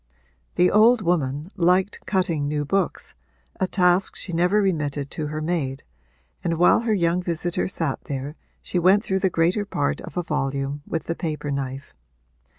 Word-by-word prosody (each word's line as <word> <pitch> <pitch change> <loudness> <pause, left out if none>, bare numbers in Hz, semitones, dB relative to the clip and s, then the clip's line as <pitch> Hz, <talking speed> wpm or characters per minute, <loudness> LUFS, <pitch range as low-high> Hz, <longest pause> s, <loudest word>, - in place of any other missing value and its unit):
The 180 +1 +4
old 220 +2 +5
woman 155 -2 0
liked 185 +2 +2
cutting 175 -7 0
new 145 0 -1
books, 195 +3 -1 0.5
a 190 - +1
task 180 0 +3
she 175 - -6
never 180 +5 +3
remitted 150 -7 -1
to 155 - -3
her 155 +1 -4
maid, 145 -5 -2 0.6
and 170 -2 0
while 175 - +5
her 225 -1 0
young 170 -1 +1
visitor 175 0 -2
sat 165 -7 -3
there 140 +2 -5 0.3
she 180 - -1
went 190 +4 +4
through 190 -4 0
the 190 - +2
greater 175 +5 +1
part 145 -8 -2
of - - -9
a 175 - 0
volume 140 -2 -2
with 165 - -2
the 165 - -2
paper 155 -3 -4
knife. 135 0 -4
170 Hz, 165 wpm, -23 LUFS, 145-185 Hz, 0.6 s, old